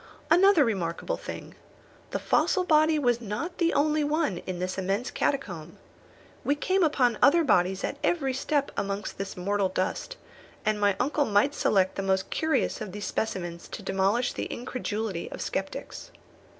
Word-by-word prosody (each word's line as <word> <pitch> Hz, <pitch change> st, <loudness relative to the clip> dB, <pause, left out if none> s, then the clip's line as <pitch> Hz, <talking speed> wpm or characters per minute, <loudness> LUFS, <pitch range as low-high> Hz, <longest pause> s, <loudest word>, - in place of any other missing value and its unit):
Another 360 Hz, -3 st, +6 dB
remarkable 195 Hz, -, -2 dB
thing. -, -, -8 dB, 0.6 s
This -, -, -4 dB
fossil 370 Hz, -, +2 dB
body 310 Hz, -2 st, +4 dB
was 245 Hz, -4 st, +1 dB
not 245 Hz, -, -4 dB
the 340 Hz, -1 st, +3 dB
only 305 Hz, +1 st, +2 dB
one 295 Hz, -, 0 dB
in 185 Hz, -1 st, -3 dB
this 185 Hz, +2 st, -3 dB
immense 195 Hz, +6 st, -1 dB
catacomb. 175 Hz, -, -2 dB, 0.7 s
We 285 Hz, -, +2 dB
came 375 Hz, +6 st, +1 dB
upon 255 Hz, -7 st, +2 dB
other 330 Hz, +4 st, +6 dB
bodies 190 Hz, -, +2 dB
at -, -, -2 dB
every 275 Hz, -6 st, +1 dB
step 280 Hz, +2 st, 0 dB
amongst 200 Hz, 0 st, -3 dB
this 195 Hz, -1 st, -5 dB
mortal 200 Hz, +1 st, 0 dB
dust, 185 Hz, -, -2 dB, 0.5 s
and 215 Hz, -1 st, +1 dB
my 200 Hz, -1 st, +3 dB
uncle 290 Hz, +1 st, +1 dB
might 210 Hz, +7 st, +3 dB
select 190 Hz, -8 st, +2 dB
the -, -, 0 dB
most 190 Hz, 0 st, 0 dB
curious 315 Hz, -6 st, 0 dB
of 205 Hz, -4 st, -6 dB
these 205 Hz, -1 st, -5 dB
specimens 175 Hz, -5 st, -3 dB
to -, -, -8 dB
demolish 195 Hz, +6 st, +1 dB
the -, -, -3 dB
incredulity 220 Hz, -6 st, -4 dB
of -, -, -7 dB
sceptics. -, -, -5 dB
225 Hz, 160 wpm, -27 LUFS, 190-295 Hz, 0.7 s, Another